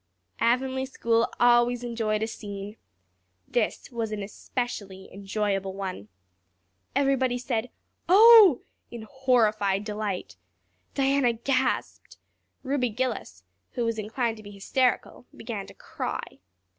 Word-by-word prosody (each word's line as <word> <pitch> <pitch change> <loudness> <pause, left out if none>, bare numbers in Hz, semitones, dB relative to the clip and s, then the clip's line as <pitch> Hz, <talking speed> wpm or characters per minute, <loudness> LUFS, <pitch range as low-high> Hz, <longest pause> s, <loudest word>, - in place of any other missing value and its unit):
Avonlea 260 +2 +1
school 230 -3 +1
always 240 0 +4
enjoyed 220 -3 -1
a - - -1
scene. 205 -1 -7 0.7
This - - -1
was 230 -3 -3
an 210 -1 -3
especially 200 -2 -5
enjoyable 195 -1 -2
one. 185 - -5 0.9
Everybody 265 -3 +2
said 245 -1 -2 0.4
"Oh" 420 - +8 0.3
in 235 -2 -8
horrified 220 -6 +1
delight. 205 - -4 0.6
Diana 270 -3 +2
gasped. 255 +3 -2 0.5
Ruby 265 -2 0
Gillis, 210 - -4 0.3
who 240 - -1
was 230 -1 -1
inclined 225 +2 -2
to 215 - -12
be 205 - -10
hysterical, 245 +5 -1
began 220 -4 -6
to - - -14
cry. - - -6
230 Hz, 110 wpm, -26 LUFS, 205-255 Hz, 0.9 s, Oh